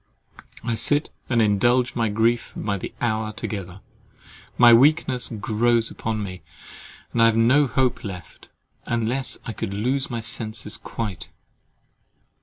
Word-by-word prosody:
I 115 0 -1
sit 145 +6 0 0.2
and 120 -3 +3
indulge 120 +5 +2
my 115 -2 +1
grief 115 +3 +1
by 100 -2 -2
the - - -6
hour 110 -2 -1
together; 95 -4 -6 0.8
my 120 -1 +8
weakness 130 0 +4
grows 115 +1 +1
upon 110 -1 -3
me; 90 -2 -7 0.7
and 120 - +2
I - - +7
have 115 -1 +2
no 130 +6 +4
hope 130 -1 0
left, 90 -5 -9 0.4
unless 120 +3 -1
I 115 - -4
could 100 -2 -4
lose 130 +6 -1
my 120 -2 -3
senses 115 -1 -3
quite. 105 -6 -5
115 Hz, 135 wpm, -23 LUFS, 110-125 Hz, 0.8 s, my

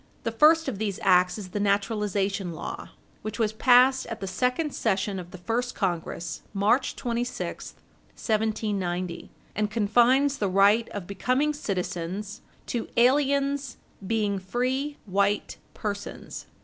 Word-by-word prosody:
The 230 - -1
first 310 +7 +5
of 230 -7 -3
these 205 -3 -2
acts 180 -1 +4
is 200 -3 -7
the 205 - -3
naturalization 200 -2 0
law, 155 - -6 0.3
which 215 - -5
was 220 -2 +1
passed 255 +3 +5
at 230 -1 -6
the - - -4
second 250 - -1
session 195 0 0
of 175 -1 -8
the 185 - -10
first 235 +7 -2
Congress, 175 -3 -3
March 215 +7 +2
26, 240 +1 -4 0.4
1790, 200 -5 -2 0.3
and 210 0 0
confines 240 +6 +3
the 200 - +1
right 200 +4 +4
of 205 -3 -6
becoming 255 +10 0
citizens 190 - -4 0.2
"to 235 - -3
aliens 280 +2 +2 0.3
being 210 -3 0
free 255 +9 -2
white 200 +1 0 0.2
persons." 205 -1 -6
210 Hz, 130 wpm, -26 LUFS, 195-250 Hz, 0.4 s, first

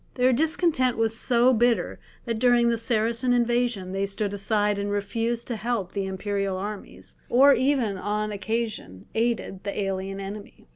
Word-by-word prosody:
Their 255 0 +3
discontent 295 -3 +1
was 225 0 +1
so 245 +2 +3
bitter 235 -5 +1 0.3
that 230 -2 -2
during 240 -1 +4
the 230 - +1
Saracen 230 +2 +1
invasion 240 -5 0
they 195 +1 -1
stood 200 +1 -3
aside 205 0 0
and 200 0 -2
refused 225 +3 -2
to 240 - -1
help 220 -4 -2
the 195 -1 -3
imperial 195 0 -2
armies, 205 +2 -8
or 275 +3 +6
even 255 -9 +1
on 210 +2 -2
occasion 205 - -4
aided 225 -4 -1
the 200 +1 -4
alien 195 0 -3
enemy. 200 +1 -8
220 Hz, 155 wpm, -25 LUFS, 200-240 Hz, 0.3 s, or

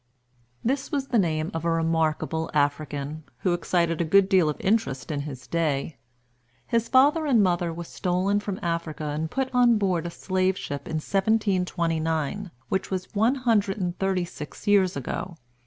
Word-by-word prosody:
This 270 +4 -1
was 275 -3 -2
the 240 -3 +3
name 160 -3 0
of 165 0 -3
a 170 - +1
remarkable 160 -1 0
African, 145 +1 -1 0.2
who 180 - +2
excited 170 -1 0
a - - +3
good 190 +4 +4
deal 185 -6 +4
of 150 - -4
interest 190 - 0
in 145 - -2
his 130 -3 -9
day. 155 -3 -1 0.7
His 230 -1 0
father 295 +4 +4
and 235 -7 +5
mother 175 -2 +1
were 170 +1 -6
stolen 185 +4 0
from 200 -2 -4
Africa 165 -2 -2
and 150 +2 -2
put 260 +3 -2
on 245 -2 +5
board 185 -5 0
a - - -3
slave 185 +1 0
ship 140 0 -5
in 160 - -4
1729, 180 -3 0 0.2
which 190 - -1
was 185 -1 -4
one 225 +6 +3
hundred 220 -6 +1
and 180 -3 -2
thirty 190 -2 +1
six 150 -1 -9
years 195 -5 +3
ago. 165 +6 -4
180 Hz, 170 wpm, -26 LUFS, 160-205 Hz, 0.7 s, and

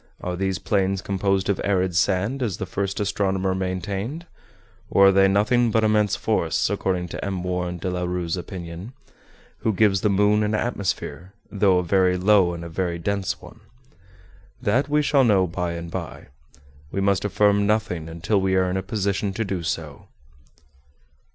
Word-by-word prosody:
Are 90 0 -4
these 95 0 -1
plains 95 -1 0
composed 95 0 0
of 100 -2 0
arid 95 -2 0
sand, 100 +8 +1
as 110 -7 -1
the - - -4
first 95 +1 -3
astronomer 95 -2 0
maintained? 95 - -3 0.6
Or 100 0 +6
are - - +5
they 95 0 +5
nothing 115 +5 +3
but 110 0 +2
immense 105 -2 +2
forests, - - 0
according 90 -2 -1
to - - -6
M. 95 -2 -3
Warren 90 -1 -2
de 85 - -5
la 90 0 -2
Rue's 90 -1 -2
opinion, 90 +3 -7 0.7
who 110 - +1
gives 100 -1 +2
the 105 - +2
moon 105 +2 +3
an 105 0 0
atmosphere, 95 -4 -3 0.2
though 100 -3 +3
a 90 - +1
very 90 0 +2
low 95 -2 +3
and 85 0 -7
a - - -5
very 85 0 -2
dense 100 +2 -2
one? - - -13 1.0
That 130 +4 +1
we 150 0 +2
shall 140 -1 +3
know 100 -6 +4
by 90 0 -3
and 85 0 -6
by. - - -6 0.6
We - - -2
must 100 -1 +1
affirm 100 0 +2
nothing 90 -7 -1
until 85 +5 0
we 95 0 +1
are 95 -1 +2
in 95 - -1
a - - -1
position 100 0 -2
to 115 - -1
do 95 -3 -3
so." 80 -3 -5
95 Hz, 175 wpm, -23 LUFS, 90-105 Hz, 1.0 s, Or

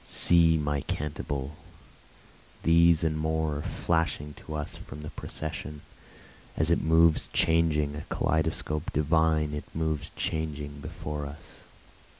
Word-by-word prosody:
See 85 -2 +6
my 75 -2 -1
cantabile! 70 -1 -4 1.1
these 85 0 +5
and 80 -1 +1
more 80 -1 -1
are - - -4
flashing 75 -2 -1
to 75 - -9
us 75 -1 -5
from 75 +2 -10
the 75 - -7
procession, 75 -1 -6 0.8
As 80 +2 +4
it 85 - +3
moves 80 0 +3
changing, 80 -3 +2
a 75 - -5
kaleidoscope 75 0 -1
divine 80 0 +2
it 75 - -5
moves 80 -1 -2
changing 75 -2 -3
before 75 +1 -6
us. 70 +2 -13
75 Hz, 125 wpm, -28 LUFS, 75-80 Hz, 1.1 s, See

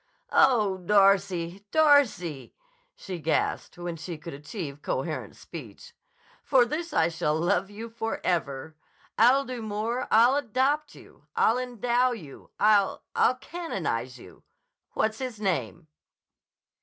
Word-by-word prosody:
"Oh, 215 -8 +4
Darcy! 195 -2 +2
Darcy!" 235 - +2 0.4
she 185 -2 -7
gasped 160 +2 -1
when 175 -1 -5
she 160 +1 -6
could 165 +2 -9
achieve 145 0 -7
coherent - - -3
speech. 480 -1 -11 0.5
"For 260 -3 +4
this 320 +6 -4
I 165 - +3
shall 165 -2 -1
love 180 +3 +1
you 215 +3 -8
forever. 170 -10 -3 0.4
I'll 260 +5 +5
do 250 -2 -5
more. 220 +3 -2
I'll 235 +5 +5
adopt 285 +4 0
you. - - -18
I'll 230 +3 +3
endow 245 0 +1
you. 155 - -11
I'll—I'll 210 +4 +2
canonize 335 +6 -4
you. - - -15 0.5
What's 220 0 0
his 255 -5 -5
name?" 185 -4 -2
210 Hz, 120 wpm, -27 LUFS, 175-250 Hz, 0.5 s, I'll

